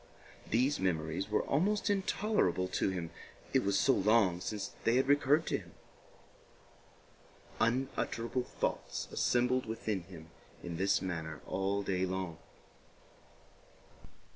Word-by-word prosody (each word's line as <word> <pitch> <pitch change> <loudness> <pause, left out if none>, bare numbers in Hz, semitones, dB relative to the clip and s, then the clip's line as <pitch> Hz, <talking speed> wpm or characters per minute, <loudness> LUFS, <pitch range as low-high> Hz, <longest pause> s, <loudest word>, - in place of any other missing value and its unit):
These 130 +6 +2
memories 85 +1 -1
were 105 - +1
almost 200 +9 +1
intolerable 200 - +1
to 95 - +1
him, 90 -3 -4 0.4
it - - +4
was 100 0 +2
so 135 - +4
long 100 -5 +3
since 105 +1 -4
they 115 - +3
had 130 +1 +3
recurred 145 +2 +4
to - - 0
him. - - -15 1.9
Unutterable 125 0 0
thoughts - - -3
assembled 125 0 +2
within 110 -3 -2
him 85 -2 -12 0.3
in 85 -1 -5
this 95 +2 +2
manner 80 -4 -4
all 100 +1 -1
day 95 -1 0
long. 90 -3 -3
100 Hz, 115 wpm, -33 LUFS, 90-130 Hz, 1.9 s, it